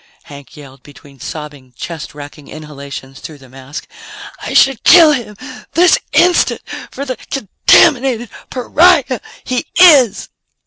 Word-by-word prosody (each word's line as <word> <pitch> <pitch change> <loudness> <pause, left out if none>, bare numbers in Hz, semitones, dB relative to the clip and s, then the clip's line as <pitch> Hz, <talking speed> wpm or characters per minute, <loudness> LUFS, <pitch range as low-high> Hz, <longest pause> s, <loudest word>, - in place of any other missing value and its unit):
Hank 140 0 -14
yelled, 135 -2 -15
between 140 0 -18
sobbing, 145 -3 -10
chest 165 -4 -8
racking 145 0 -12
inhalations 140 -3 -10
through 155 - -11
the 135 -2 -18
mask. 135 +2 -10 0.5
"I - - -6
should 270 -3 +3
kill 335 -4 +7
him 235 -7 -4 0.4
this 350 +4 +3
instant 355 0 +2 0.3
for 280 - -7
the 255 -2 -5
contaminated 255 - +1 0.2
pariah 280 0 +2 0.2
he 255 -1 -4
is!" 275 - +5
185 Hz, 125 wpm, -14 LUFS, -, 0.5 s, kill